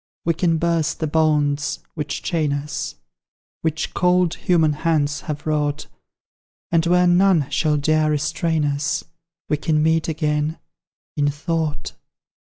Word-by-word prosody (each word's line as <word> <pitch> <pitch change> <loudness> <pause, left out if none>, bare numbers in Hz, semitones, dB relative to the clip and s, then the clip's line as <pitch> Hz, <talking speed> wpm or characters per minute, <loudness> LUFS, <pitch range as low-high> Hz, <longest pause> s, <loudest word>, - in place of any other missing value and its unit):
We 170 - +3
can 165 0 +1
burst 165 -1 0
the 160 - 0
bonds 150 -2 +1 0.2
which 150 -2 -4
chain 155 -4 0
us, 145 0 -4 0.7
Which 160 0 -2
cold 180 -1 +2
human 160 -4 +2
hands 150 -2 0
have 150 -1 -4
wrought, 150 -1 -1 0.9
And 165 -1 +3
where 180 +1 +4
none 175 -4 +4
shall 150 -1 +1
dare 155 +1 +2
restrain 160 +1 0
us 150 +3 -1 0.4
We 150 - +1
can 155 0 +1
meet 160 0 +2
again, 150 0 -1 0.6
in 145 -1 +2
thought. 155 +1 -3
155 Hz, 130 wpm, -21 LUFS, 150-165 Hz, 0.9 s, where